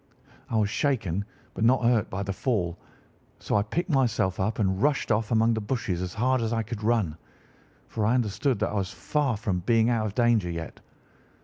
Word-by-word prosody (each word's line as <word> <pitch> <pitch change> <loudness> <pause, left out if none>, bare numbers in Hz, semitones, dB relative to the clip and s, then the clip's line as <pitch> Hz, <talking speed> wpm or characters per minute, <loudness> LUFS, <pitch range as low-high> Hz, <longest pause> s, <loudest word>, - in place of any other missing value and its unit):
"I 115 - 0
was 105 -2 +1
shaken 100 - 0 0.3
but - - -3
not 125 +2 +4
hurt 115 -3 +2
by 100 +1 -3
the 100 0 -3
fall; 95 -7 -1 0.6
so - - -2
I 105 - +4
picked 170 - -2
myself 120 -9 +1
up 105 +3 0
and 95 -3 0
rushed 145 -3 +1
off 110 0 +1
among 115 0 +3
the 110 - -2
bushes 105 -6 -2
as 90 -1 -4
hard 130 +3 +2
as 115 -1 -1
I 115 -1 0
could 115 0 -6
run, 105 -8 +1 0.7
for 110 - -3
I 120 - +3
understood 120 +2 0
that - - +1
I - - -6
was 100 -3 -1
far 120 +7 -1
from 100 -4 -1
being 115 +5 +3
out 110 -2 +1
of 100 - -7
danger 120 -7 +3
yet. 85 -1 -6
110 Hz, 205 wpm, -27 LUFS, 100-120 Hz, 0.7 s, not